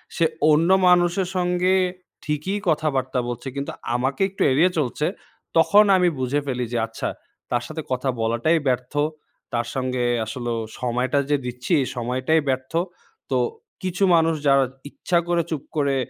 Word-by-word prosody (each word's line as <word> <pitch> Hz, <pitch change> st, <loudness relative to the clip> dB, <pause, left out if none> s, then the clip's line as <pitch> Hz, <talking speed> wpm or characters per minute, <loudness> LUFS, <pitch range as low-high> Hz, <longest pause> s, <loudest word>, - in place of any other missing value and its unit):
সে 170 Hz, -, +3 dB, 0.3 s
অন্য 160 Hz, +3 st, +3 dB, 0.2 s
মানুষের 180 Hz, +1 st, +3 dB
সঙ্গে 180 Hz, +1 st, +2 dB, 0.5 s
ঠিকই 155 Hz, +7 st, -2 dB
কথাবার্তা 135 Hz, -5 st, 0 dB
বলছে। 120 Hz, +2 st, -5 dB
কিন্তু 140 Hz, 0 st, -3 dB, 0.2 s
আমাকে 130 Hz, +5 st, -1 dB
একটু 195 Hz, -, -9 dB
এড়িয়ে 165 Hz, +8 st, +4 dB
চলছে 150 Hz, 0 st, 0 dB, 0.5 s
তখন 205 Hz, +6 st, +6 dB
আমি 180 Hz, -1 st, +3 dB
বুঝে 130 Hz, +3 st, 0 dB
ফেলি 125 Hz, -2 st, -1 dB
যে -, -, +1 dB
আচ্ছা 115 Hz, -, -4 dB, 0.4 s
তার 120 Hz, -1 st, +1 dB
সাথে 160 Hz, +1 st, -5 dB
কথা 130 Hz, +1 st, 0 dB
বলাটাই 120 Hz, +9 st, +2 dB
ব্যর্থ। 125 Hz, 0 st, -2 dB, 0.6 s
তার 120 Hz, -1 st, -1 dB
সঙ্গে 130 Hz, -1 st, -1 dB, 0.2 s
আসলেও 120 Hz, 0 st, -3 dB, 0.2 s
সময়টা 125 Hz, +3 st, 0 dB
যে 145 Hz, -, +3 dB
দিচ্ছি, 125 Hz, 0 st, -5 dB
এই 130 Hz, -, -1 dB
সময়টাই 130 Hz, +6 st, +1 dB
ব্যর্থ। 130 Hz, +1 st, -2 dB, 0.6 s
তো -, -, +2 dB, 0.5 s
কিছু 185 Hz, +1 st, -1 dB
মানুষ 165 Hz, 0 st, +3 dB
যারা 135 Hz, -1 st, +5 dB, 0.2 s
ইচ্ছা 175 Hz, +4 st, -1 dB
করে 175 Hz, -1 st, +2 dB
চুপ 150 Hz, -3 st, -3 dB
করে 140 Hz, -2 st, +2 dB
140 Hz, 150 wpm, -23 LUFS, 125-165 Hz, 0.6 s, তখন